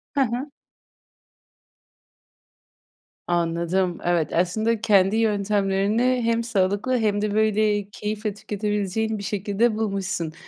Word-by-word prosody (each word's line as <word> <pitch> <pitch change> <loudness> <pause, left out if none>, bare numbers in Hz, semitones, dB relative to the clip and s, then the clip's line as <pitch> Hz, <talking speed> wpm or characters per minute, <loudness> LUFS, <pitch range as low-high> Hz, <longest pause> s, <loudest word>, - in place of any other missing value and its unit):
Hı 280 - +3
hı. 255 +3 -1 2.8
Anladım, 175 +1 0
evet, 175 -3 0
aslında 215 +6 +1
kendi 200 -2 +4
yöntemlerini 210 +3 +1
hem 230 0 +1
sağlıklı 205 +3 0
hem 210 -3 +1
de, 210 -1 -1
böyle, 215 -1 +1
keyifle 210 +1 -4
tüketebileceğin 210 +1 -2
bir 200 - -7
şekilde 205 +3 0
bulmuşsun. 195 -6 -2
205 Hz, 95 wpm, -23 LUFS, 195-220 Hz, 2.8 s, kendi